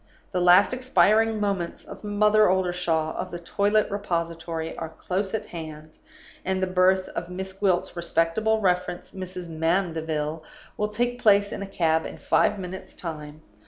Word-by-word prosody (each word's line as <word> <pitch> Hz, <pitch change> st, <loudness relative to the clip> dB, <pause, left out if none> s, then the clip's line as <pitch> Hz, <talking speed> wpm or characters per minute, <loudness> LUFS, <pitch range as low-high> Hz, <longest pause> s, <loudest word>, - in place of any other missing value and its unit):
The 180 Hz, -, 0 dB
last 180 Hz, +6 st, +6 dB
expiring 225 Hz, -3 st, +3 dB
moments 195 Hz, -4 st, -2 dB
of 200 Hz, -, -11 dB
Mother 210 Hz, 0 st, +4 dB
Oldershaw, 175 Hz, -4 st, 0 dB
of 185 Hz, -, -4 dB
the 175 Hz, -, -5 dB
Toilet 205 Hz, +5 st, +1 dB
Repository, 170 Hz, -4 st, -3 dB
are 160 Hz, -, -5 dB
close 190 Hz, +5 st, -3 dB
at 220 Hz, -, -3 dB
hand, 155 Hz, -2 st, -9 dB, 0.5 s
and 190 Hz, 0 st, -1 dB
the 185 Hz, -, +1 dB
birth 185 Hz, 0 st, +3 dB
of 175 Hz, -, -5 dB
Miss 190 Hz, +1 st, -5 dB
Gwilt's 190 Hz, -2 st, 0 dB
respectable 170 Hz, +6 st, +1 dB
reference, 180 Hz, -2 st, 0 dB
Mrs. 185 Hz, -2 st, -7 dB
Mandeville, 160 Hz, -2 st, -1 dB, 0.3 s
will 210 Hz, 0 st, -1 dB
take 245 Hz, +3 st, -1 dB
place 205 Hz, -1 st, +4 dB
in -, -, -5 dB
a 200 Hz, -, -4 dB
cab 160 Hz, -4 st, +1 dB
in -, -, -9 dB
five -, -, +2 dB
minutes' 190 Hz, 0 st, -8 dB
time. 155 Hz, -2 st, -7 dB
185 Hz, 155 wpm, -25 LUFS, 165-200 Hz, 0.5 s, last